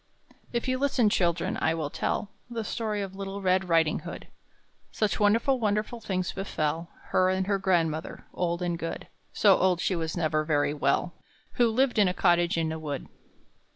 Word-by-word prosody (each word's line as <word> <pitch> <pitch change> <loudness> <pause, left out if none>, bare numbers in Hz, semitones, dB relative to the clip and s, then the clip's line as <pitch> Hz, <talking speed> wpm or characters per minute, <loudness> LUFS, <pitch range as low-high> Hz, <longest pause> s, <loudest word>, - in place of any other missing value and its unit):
If 235 +1 -2
you 255 0 0
listen, 260 -6 +2
children, 170 -3 +1
I 160 - +2
will 155 -3 -3
tell 200 - -2 0.2
The 230 -2 -3
story 210 -2 -2
of 190 -1 -7
little 195 0 -5
Red 185 -1 +1
Riding 165 -2 +3
hood: - - -9 0.6
Such 215 -2 0
wonderful, 230 +6 +3
wonderful 215 +2 -1
things 185 -3 -2
befell 165 -4 -2 0.2
Her 185 0 +3
and 190 0 0
her 200 0 0
grandmother, 165 -4 0
old 175 0 -1
and 175 -1 -1
good 165 - -5 0.2
(So 200 -3 +5
old 185 -2 +2
she 185 - 0
was 160 0 -3
never 155 -2 +1
very 145 -2 +1
well), 170 +3 0 0.4
Who 240 -1 +3
lived 245 0 +2
in 205 - +5
a 180 - -1
cottage 175 -2 +3
in 160 -1 0
a 160 - -4
wood. 145 -3 -5
185 Hz, 180 wpm, -27 LUFS, 165-210 Hz, 0.6 s, So